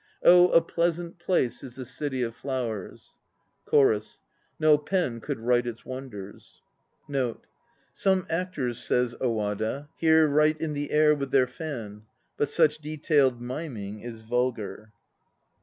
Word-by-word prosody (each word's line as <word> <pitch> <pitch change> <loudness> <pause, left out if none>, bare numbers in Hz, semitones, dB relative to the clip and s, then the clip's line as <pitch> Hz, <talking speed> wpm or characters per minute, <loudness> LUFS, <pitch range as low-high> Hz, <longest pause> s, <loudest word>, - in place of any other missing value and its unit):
Oh, 180 0 +8
a 165 - +6
pleasant 170 +1 -2
place 175 -8 0
is 125 -3 -9
the 130 - -6
City 130 0 -3
of 115 -1 -4
Flowers; 120 -8 -5 0.5
CHORUS. 110 -7 +2 0.4
No 155 -1 +6
pen 150 -5 -1
could - - -4
write 120 +1 +2
its 115 -1 -6
wonders. 130 -7 -9 0.4
1 140 -1 -2
1 120 -2 -3 0.6
Some 190 -2 +1
actors, 155 -9 -2
says 125 -1 +1
Owada, 110 +4 -2
here 160 -1 +5
write 150 +1 +3
in 160 -2 -2
the 145 0 -3
air 150 0 +5
with 140 -2 -3
their 130 -1 +4
fan; 120 -7 -7 0.3
but 145 - 0
such 155 -1 +3
detailed 145 -5 +1
miming 120 -7 -5
is 115 0 -8
vulgar. 110 -2 -2
135 Hz, 140 wpm, -27 LUFS, 115-155 Hz, 0.6 s, Oh